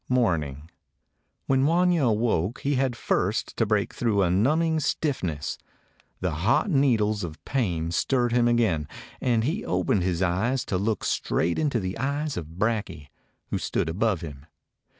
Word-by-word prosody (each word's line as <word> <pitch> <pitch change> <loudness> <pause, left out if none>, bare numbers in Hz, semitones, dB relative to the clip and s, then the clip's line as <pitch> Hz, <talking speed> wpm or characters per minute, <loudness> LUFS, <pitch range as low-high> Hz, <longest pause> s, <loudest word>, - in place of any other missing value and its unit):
Morning. 80 - 0 0.8
When 135 0 +2
Wanya 175 -2 +3
awoke 110 -2 0
he 145 - 0
had 130 -2 0
first - - -1
to - - +2
break - - 0
through 105 -4 +1
a 85 - +2
numbing 155 - +2
stiffness. 130 - -2 0.6
Then 90 -2 0
hot 95 - +1
needles 110 - +2
of 80 -2 -8
pain 85 -11 -1
stirred 120 +6 +1
him 120 0 +3
again, 110 -11 +2 0.3
and 115 -3 +2
he 160 - -1
opened 90 +2 +1
his 90 0 0
eyes 110 +9 0
to 90 - -1
look 105 0 -1
straight 85 +1 0
into 145 -6 +1
the 95 +1 -4
eyes 145 +3 -1
of 80 0 -7
Brakje, 100 -9 -2 0.4
who - - 0
stood - - -1
above 100 +2 0
him. 75 -3 -9
110 Hz, 150 wpm, -26 LUFS, 85-130 Hz, 0.8 s, Wanya